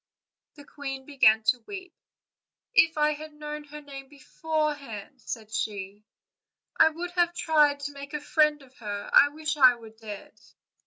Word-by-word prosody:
The 290 -2 -14
queen 270 -2 -7
began 220 -6 +4
to 220 +3 +2
weep. 375 -3 -8 0.8
"If 325 -9 +4
I 300 0 +3
had 305 +1 -9
known 300 0 -7
her 300 +1 -10
name 275 -2 -10
beforehand," 290 -5 -4
said 220 -3 -7
she, 205 -1 -4 0.7
"I - - +6
would 345 +3 -6
have 345 -1 +1
tried 295 -4 +3
to 290 0 -4
make 280 +1 -8
a - - -2
friend 300 0 +2
of 260 -1 -20
her: 205 -3 -5
I 285 - +8
wish 305 +1 -4
I 255 -3 +7
were 225 -2 -13
dead." 220 -2 -10
285 Hz, 160 wpm, -27 LUFS, 245-305 Hz, 0.8 s, I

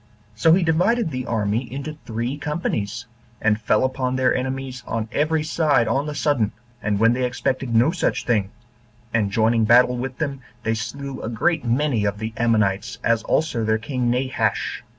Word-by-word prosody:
So 160 +9 +4
he 180 +1 +4
divided 175 +5 +2
the 130 -1 -4
army 110 +2 -1
into 140 +3 -5
three 120 +4 -2
companies; 130 - -3 0.3
and 110 0 +1
fell 105 +1 +2
upon 130 -1 -1
their 130 0 +3
enemies 130 0 -3
on 115 -1 -2
every 155 +2 +1
side 155 -6 +2
on 135 +6 0
the 150 - -4
sudden, 140 -8 +1 0.3
and 105 -1 0
when 115 +2 +5
they 130 +1 -1
expected 125 0 -1
no 120 +7 +5
such 175 - -1
thing; 105 -5 +1 0.6
and 110 -3 +2
joining 110 +2 +2
battle 125 +2 +5
with 125 +1 -4
them, 140 -3 -3 0.2
they 110 - +1
slew 135 +4 -5
a - - -4
great 120 +9 +1
many 125 -1 +1
of 100 0 -1
the 110 +1 -5
Ammonites, 110 0 +1
as 115 -1 +2
also 150 -6 0
their 110 0 +2
king 125 +1 -2
Nabash. 130 +2 -1
125 Hz, 175 wpm, -22 LUFS, 110-140 Hz, 0.6 s, when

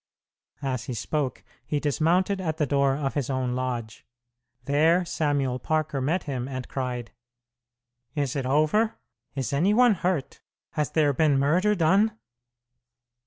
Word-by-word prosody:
As 130 -4 -2
he 125 - -4
spoke, 140 +4 -2 0.2
he 150 - -1
dismounted 175 +7 +1
at 160 -3 -2
the 150 - +1
door 140 -1 +2
of 140 -2 -2
his 140 -3 -2
own 130 -2 -1
lodge. 125 -3 -4 0.6
There 160 +6 +3
Samuel 145 -6 0
Parker 155 0 -1
met 160 +8 0
him, 130 -4 -3
and 130 -2 -5
cried, 125 -3 -4 1.0
"Is 140 -3 -1
it 135 -2 -2
over? 155 +11 +2 0.4
Is 135 -2 -2
any 180 +9 +3
one 245 -1 +6
hurt? 175 -7 -2 0.3
Has 150 -3 -1
there 150 -3 +2
been 145 0 +3
murder 175 +10 +3
done?" 200 +6 +3
145 Hz, 140 wpm, -26 LUFS, 130-165 Hz, 1.0 s, one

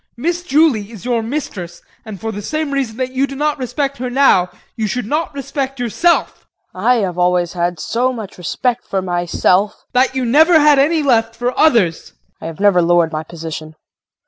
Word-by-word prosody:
Miss 340 +7 -1
Julie 285 - +2
is 225 -2 -11
your 240 -2 0
mistress 220 - -5 0.2
and 210 -3 -8
for 225 0 -4
the 205 -1 -6
same 310 +6 -3
reason 260 -5 -2
that 255 0 -2
you 265 +2 0
do 275 - -8
not 295 +1 -1
respect 275 +1 -3
her 250 0 -3
now 245 -9 +3 0.3
you 220 -2 -2
should 245 +3 -3
not 305 +8 -1
respect 270 -1 -4
yourself. 290 +9 0 0.2
KRISTIN. 185 +5 -5
I 250 - +6
have 180 -1 -5
always 180 -1 +1
had 175 -1 -2
so 250 +8 0
much 220 -7 -8
respect 245 +7 -2
for 190 -1 -2
myself 180 +2 +1
JEAN. - - -30
That 260 +1 +2
you 260 -1 -1
never 315 +7 +5
had 295 -2 +5
any 310 +3 +2
left 230 -4 +2
for 245 +2 -2
others! 230 - +3
KRISTIN. - - -19 0.2
I - - -8
have 165 -2 -8
never 200 -3 +4
lowered 170 -1 +2
my 155 -1 -3
position. 160 -1 -8
235 Hz, 200 wpm, -17 LUFS, 180-275 Hz, 0.3 s, I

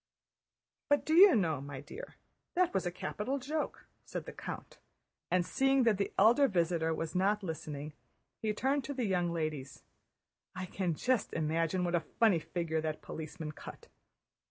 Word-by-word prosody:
"But 290 0 +3
do 315 - +1
you 370 0 +9
know, 160 - +1
my 140 -1 -7
dear, - - -9 0.4
that 365 0 +3
was 190 -2 0
a - - -1
capital 210 +8 -3
joke," 295 +4 -3 0.2
said - - -6
the - - -8
count; - - -7 0.5
and 180 -1 +2
seeing 270 +3 +3
that 220 -4 +3
the 200 - 0
elder 240 +8 +6
visitor 170 -5 +1
was 160 0 -3
not 200 +3 +2
listening, 150 -3 -5 0.5
he 215 - +1
turned 270 +6 0
to 285 - -4
the 250 -3 0
young 180 -3 +1
ladies. 155 -5 -4 0.7
"I 185 0 -3
can 180 -2 -2
just 250 +6 0
imagine 165 +3 0
what 175 -1 -1
a 175 - +4 0.2
funny 215 -7 +5
figure 160 -1 -2
that 155 -1 -3
policeman 160 0 -6
cut!" - - -11
180 Hz, 165 wpm, -33 LUFS, 160-245 Hz, 0.7 s, you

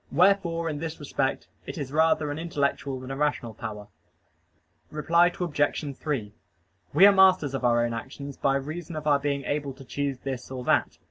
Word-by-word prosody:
Wherefore 170 0 +3
in 150 -2 -3
this 160 0 -5
respect 135 -2 -2 0.2
it - - -6
is 140 -4 -4
rather 155 -1 +2
an 145 - -4
intellectual 140 -4 -1
than 130 +1 -8
a - - -3
rational 145 -5 -1
power. 105 -3 -7 1.0
Reply 170 +3 +3
Obj. 145 -4 -1
3: 125 -10 -3 0.6
We 170 +7 +7
are 205 - +9
masters 185 -7 +5
of 135 - -3
our 120 -1 +3
own 120 - -2
actions 135 +4 -7
by 135 - +1
reason 155 +4 -4
of 155 -1 -5
our 145 -2 +4
being 140 -1 -1
able 145 -1 -2
to 135 0 -13
choose 140 +1 -2
this 130 -1 -5
or 130 -1 -5
that. - - +1
145 Hz, 185 wpm, -26 LUFS, 135-160 Hz, 1.0 s, are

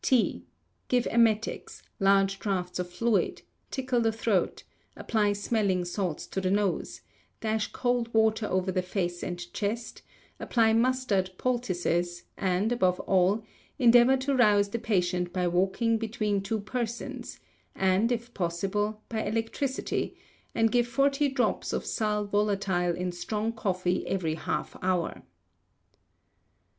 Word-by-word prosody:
T. 255 -4 +1 0.4
Give 245 -1 +2
emetics, 225 -1 +1 0.2
large 195 0 +3
draughts 180 -3 -2
of 180 -1 -3
fluids, 225 +4 0 0.3
tickle 255 -2 0
the 225 -1 +2
throat, 220 -4 0 0.3
apply 210 -2 +1
smelling 200 -3 0
salts 175 -3 -3
to 190 - -3
the 185 - 0
nose, 200 -1 0 0.4
dash 220 -1 -1
cold 245 -2 0
water 220 -1 +2
over 185 0 0
the 185 - 0
face 180 -1 -2
and 175 -1 -3 0.2
chest, 225 +3 -3 0.4
apply 225 -2 +2
mustard 230 -5 +2
poultices, 175 -8 -1
and, 190 +4 0
above 185 -6 +2
all, 190 +3 +2 0.3
endeavour 245 0 +6
to 270 +2 -1
rouse 210 -5 +4
the 235 - -3
patient 180 -5 0
by 180 -1 0
walking 195 +6 +1
between 215 -3 -1
two 210 +2 -2
persons; 235 +2 -4 0.4
and, 195 +5 +2
if 240 0 -3
possible, 200 +4 -2
by 220 -1 -2
electricity; 225 +5 -2 0.4
and 225 -1 +3
give 240 -1 +3
forty 275 +3 +2
drops 260 -2 0
of - - -2
sal 210 -1 0
volatile 200 -4 +1
in 180 +1 -2
strong 210 +5 -2
coffee 185 -4 -1
every 170 -5 -1
half 160 - -3
hour. 180 -2 -1
210 Hz, 130 wpm, -28 LUFS, 185-230 Hz, 0.4 s, endeavour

